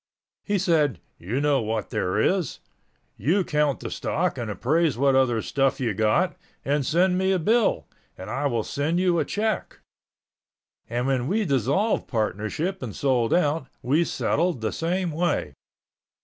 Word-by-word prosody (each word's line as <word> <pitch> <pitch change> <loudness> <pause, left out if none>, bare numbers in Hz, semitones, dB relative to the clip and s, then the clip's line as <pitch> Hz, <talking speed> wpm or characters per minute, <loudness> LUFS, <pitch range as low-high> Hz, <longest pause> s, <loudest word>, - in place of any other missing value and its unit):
He 205 -1 0
said, 155 - +2 0.2
"You 105 +10 -2
know 145 -2 +2
what 110 -1 -3
there 90 +2 -1
is. 180 - +1 0.6
You 185 +6 +2
count 150 -4 0
the - - -5
stock 175 +3 -1
and 115 -2 -3
appraise 145 +5 +1
what 135 +1 +3
other 125 -4 +2
stuff 135 -1 +1
you 120 -5 0
got, 110 +1 +1 0.3
and 145 +1 +1
send 180 +6 +2
me 190 0 +2
a 190 - +3
bill, 220 +7 +2 0.3
and 95 - -8
I 135 +6 -1
will 120 -5 -1
send 155 +9 -1
you 180 -2 +2
a - - +1
check." 215 +1 -2 1.1
And 120 +2 -1
when 130 -2 0
we 210 +5 +1
dissolved 140 - +1
partnership 115 - -2
and 110 - -6
sold 125 -4 +1
out, 150 -4 +1 0.2
we 145 +7 +3
settled 170 -3 0
the 110 - -1
same 175 +1 -1
way. 170 +2 -1
145 Hz, 160 wpm, -25 LUFS, 120-175 Hz, 1.1 s, what